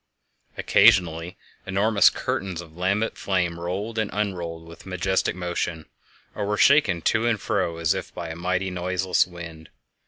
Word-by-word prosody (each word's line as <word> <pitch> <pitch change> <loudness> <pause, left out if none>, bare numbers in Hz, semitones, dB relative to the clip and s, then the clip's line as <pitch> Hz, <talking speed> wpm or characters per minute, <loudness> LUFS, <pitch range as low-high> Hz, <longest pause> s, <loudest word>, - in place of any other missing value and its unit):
Occasionally 85 -3 +3 0.3
enormous 100 +1 +4
curtains 95 -3 -3
of 80 -2 -10
lambent 100 +5 -1
flame 90 -3 -1
rolled 100 +6 -3
and 110 -2 -1
unrolled 85 -5 -3
with 85 - -13
a - - -7
majestic 90 0 0
motion, 85 -2 -3 0.5
or 105 - -4
were 105 0 0
shaken 105 - +4
to 110 +7 +2
and 115 -3 +1
fro 90 -5 -1
as 85 +2 +1
if 95 - -6
by 85 -2 -6
a 80 - -6
mighty, 90 +2 -1
noiseless 90 0 0
wind. 85 -3 -10
90 Hz, 155 wpm, -24 LUFS, 85-100 Hz, 0.5 s, enormous